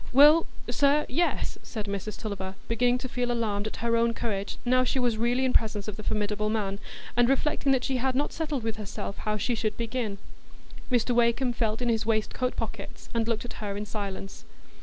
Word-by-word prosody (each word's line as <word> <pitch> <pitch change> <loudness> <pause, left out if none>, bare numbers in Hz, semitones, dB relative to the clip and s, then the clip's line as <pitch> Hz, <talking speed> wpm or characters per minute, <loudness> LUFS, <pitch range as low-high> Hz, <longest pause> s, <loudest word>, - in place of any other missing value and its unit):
"Well, 295 +5 +7 0.2
sir, 290 +1 +3
yes," 335 +7 0
said 215 -3 -5
Mrs 200 +1 -4
Tulliver, 195 -3 -4
beginning 245 +2 +3
to 255 - -5
feel 245 -1 -1
alarmed 215 -3 0
at - - -5
her 230 0 +3
own 230 0 +2
courage, 200 -4 -2
now 255 +1 +4
she 255 - 0
was 245 -3 +2
really 245 +3 +2
in 255 - +1
presence 215 -2 +1
of 210 - -3
the 215 - -7
formidable 210 0 0
man, 200 -2 -1 0.4
and 240 0 +4
reflecting 275 0 +2
that 255 -1 +1
she 265 - 0
had 260 +1 0
not 285 +3 0
settled 300 -6 -2
with 225 -1 -2
herself 200 -1 -5
how 215 0 -1
she 225 +4 0
should 215 -2 -1
begin. 230 -3 -2 0.7
Mr 245 -1 +2
Wakem 240 +1 +3
felt 225 0 0
in 240 - +1
his 225 -1 +2
waistcoat 225 +3 0
pockets, 220 -3 -6
and 230 -1 +1
looked 230 0 -1
at 245 - -7
her 200 -1 -3
in 210 - -3
silence. 200 -2 -5
230 Hz, 200 wpm, -28 LUFS, 210-250 Hz, 0.7 s, Well